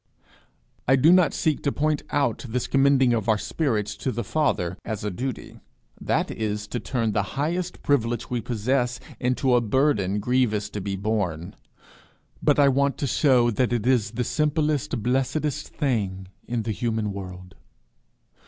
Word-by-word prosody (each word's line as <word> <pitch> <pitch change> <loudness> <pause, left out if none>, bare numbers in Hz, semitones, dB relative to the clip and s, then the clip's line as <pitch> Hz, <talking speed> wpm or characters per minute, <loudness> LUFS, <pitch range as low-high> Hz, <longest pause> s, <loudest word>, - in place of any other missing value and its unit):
I 135 - +6
do 155 +6 +6
not 180 -2 +5
seek 155 -3 0
to 140 - 0
point 150 +1 0
out 140 -6 0
this 125 +2 -1
commending 135 -2 +4
of 115 -1 -1
our 110 - +4
spirits 110 -4 -1
to 135 - -2
the 120 0 -3
Father 100 - 0
as 110 -3 -4
a 105 - -2
duty: 125 +6 -5 0.4
that - - 0
is 105 -1 -3
to 120 - -3
turn 115 -1 -1
the 100 - +1 0.2
highest 170 +5 -2
privilege 120 -4 +1
we 120 -1 -2
possess 125 +2 -1 0.2
into 125 +1 +1
a 120 - +4
burden 110 -5 +1
grievous 110 -3 0
to 105 - -4
be 100 0 -3
borne. 95 -5 -2 0.9
But - - +3
I 145 -1 +6
want 140 0 +2
to - - -2
shew 125 -2 +3
that 120 +3 0
it 120 -2 -1
is 125 -4 +2
the 125 +2 -1
simplest 150 -3 0
blessedest 135 +4 -1
thing 100 - -2 0.2
in 120 -2 -2
the 110 - -2
human 110 -1 -2
world. 90 -1 -8
120 Hz, 160 wpm, -25 LUFS, 105-140 Hz, 0.9 s, I